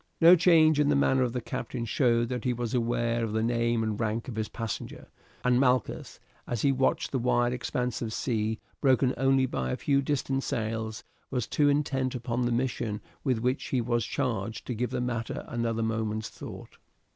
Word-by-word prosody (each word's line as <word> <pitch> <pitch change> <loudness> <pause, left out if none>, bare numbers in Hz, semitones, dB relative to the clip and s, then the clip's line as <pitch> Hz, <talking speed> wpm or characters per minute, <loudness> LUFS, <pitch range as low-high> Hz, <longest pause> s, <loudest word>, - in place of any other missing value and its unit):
No 170 +2 +9
change 160 -3 +5
in 145 -1 +3
the 145 - +3
manner 135 -1 +3
of 125 -2 +1
the 125 0 -3
captain 120 +1 -4
showed 120 -1 +2
that 125 -3 -3
he 125 - +1
was 120 -1 -3
aware 120 -1 0
of 110 -2 -2
the 110 0 +1
name 115 -1 +1
and 110 -1 -2
rank 115 0 -1
of 125 - -5
his 110 -1 -2
passenger, 115 -2 -5 0.4
and 125 0 +3
Malchus, 125 -2 0 0.3
as 120 -3 -2
he 140 - +4
watched 135 0 +1
the 130 - 0
wide 120 0 +2
expanse 125 -1 -2
of 115 -2 -3
sea, 110 -2 -1 0.2
broken 130 -1 +3
only 135 0 +3
by 65 - -2
a - - -1
few 140 -1 +2
distant 135 -1 -1
sails, 110 -2 -3 0.3
was 125 -4 -1
too 145 -1 +2
intent 135 -3 0
upon 120 0 -1
the - - 0
mission 120 -3 -1 0.2
with 130 -4 +1
which 125 +3 0
he 130 - 0
was 120 0 0
charged 115 0 -2
to 125 - -3
give 120 +2 -2
the - - -2
matter 120 -2 -3
another 115 -1 -1
moment's 110 -1 -2
thought. - - -10
120 Hz, 195 wpm, -28 LUFS, 115-130 Hz, 0.4 s, No